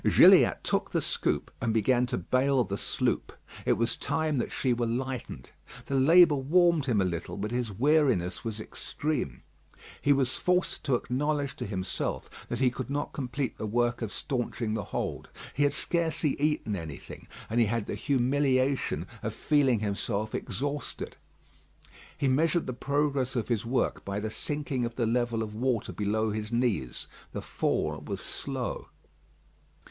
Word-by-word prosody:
Gilliatt - - +7
took - - 0
the - - +1
scoop - - -1
and 115 - +1
began 120 +3 +3
to - - -1
bale 130 +7 +2
the 100 - -3
sloop. - - -1 0.3
It - - +5
was 115 0 +1
time 155 -4 0
that - - -2
she 130 -2 +1
were 120 0 0
lightened. 125 - -4 0.3
The - - -4
labour 155 +3 +6
warmed 165 +2 +3
him 115 -5 +2
a 95 - +3
little, 85 +1 -3
but 105 +2 -3
his 120 -3 -1
weariness 125 - +2
was 110 -2 -4
extreme. 120 - -3 0.6
He 145 - +3
was 135 -2 +2
forced 180 0 0
to 135 - +3
acknowledge 140 +3 -1
to - - -4
himself 95 -9 -3 0.2
that - - -2
he 130 -2 +3
could 130 +1 -5
not 145 +1 -2
complete 130 -1 -3
the 110 - -2
work 120 +3 +1
of 110 -3 -3
staunching 120 -3 -2
the 105 -4 -2
hold. - - -4 0.2
He 145 - -2
had 145 0 +4
scarcely 165 -3 0
eaten 150 -8 +1
anything, 80 -6 -8 0.2
and 115 - 0
he 115 - +4
had 115 0 -1
the - - -4
humiliation 135 0 +1 0.2
of - - -3
feeling 135 -7 +3
himself 105 +1 -2
exhausted. 145 +2 -4 1.0
He 140 - +1
measured 160 +6 +2
the 130 - -3
progress 140 0 0
of 120 -1 -1
his 115 -1 0
work 130 +2 0
by 100 +1 -3
the 110 +1 -3
sinking 145 -1 -2
of 120 0 -3
the 120 - +1
level 120 -1 +1
of 105 -1 -6
water 120 0 -1
below 110 +1 0
his 105 +1 -4
knees. 115 - 0 0.3
The - - -3
fall - - -1
was - - -4
slow. - - -4
125 Hz, 165 wpm, -29 LUFS, 110-140 Hz, 1.0 s, Gilliatt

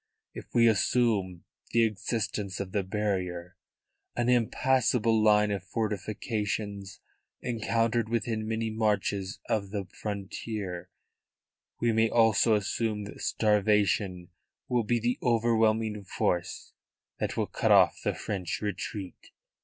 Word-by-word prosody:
If - - -11
we 120 -1 +6
assume 105 -4 +1 0.3
the 115 0 +5
existence 105 -2 -2
of 100 -2 -4
the 100 - +1
barrier 95 -3 -3 0.6
an 120 0 0
impassable 120 -2 +2
line 105 -1 +4
of 100 -2 -2
fortifications 105 -1 -3 0.4
encountered 115 -1 0
within 110 -1 -1
many 110 0 -1
marches 105 -3 -1
of 100 -3 -1
the 100 -1 -3
frontier 100 -2 -5 0.9
we 120 - +2
may 110 0 +3
also 115 -1 +4
assume 105 +1 -1
that 100 - -9
starvation 105 -4 +1 0.4
will 120 -2 +1
be 120 +2 +1
the 120 +2 -1
overwhelming 110 -3 +2
force 90 -1 -2 0.5
that - - -2
will - - +1
cut - - 0
off - - +5
the - - 0
French 95 -3 -3
retreat." 100 -1 -5
105 Hz, 115 wpm, -28 LUFS, 100-115 Hz, 0.9 s, we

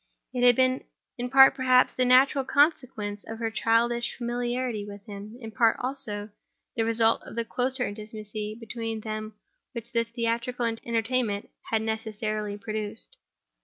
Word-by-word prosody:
It 250 - -1
had 245 -1 +7
been 255 +1 +2 0.4
in 245 +1 -2
part, 270 +1 +8
perhaps, 255 -1 +4
the 255 - +1
natural 265 +2 +5
consequence 255 -8 +1
of 225 - -6
her 225 -1 -2
childish 235 +2 +1
familiarity 240 -2 -2
with 205 0 -10
him; 210 +1 -9
in 225 -3 -8
part, 230 -1 +3
also, 215 -5 -3 0.4
the 225 - +1
result 225 0 +3
of - - -11
the 230 0 -1
closer 255 +1 0
intimacy 215 0 -6
between 225 -1 -4
them 215 0 -5 0.4
which 235 -1 -6
the 230 -2 +2
theatrical 235 +1 -2
entertainment 230 -1 -1 0.2
had 220 -1 +1
necessarily 215 -2 -3
produced. 215 0 -5
230 Hz, 145 wpm, -27 LUFS, 215-245 Hz, 0.4 s, part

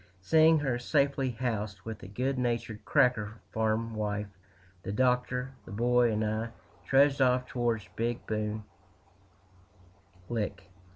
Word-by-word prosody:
Seeing 160 - +5
her 135 -5 0
safely 140 0 +1
housed 110 -5 -3
with 110 -2 -6
the - - -10
good 130 +6 -1
natured 115 -3 -2
"cracker" 115 -4 +2 0.2
farm 110 +1 0
wife, 105 -1 -2 0.5
the 95 - -5
Doctor, 125 +2 +1
the - - -12
Boy, 120 +2 +3
and 110 0 0
I 110 +2 -1 0.4
trudged 140 +1 +4
off 125 -1 +3
toward 120 -4 -1
Big 120 +1 -2
Bone 110 0 -2 1.6
Lick. 105 -5 -4
120 Hz, 125 wpm, -30 LUFS, 110-125 Hz, 1.6 s, Seeing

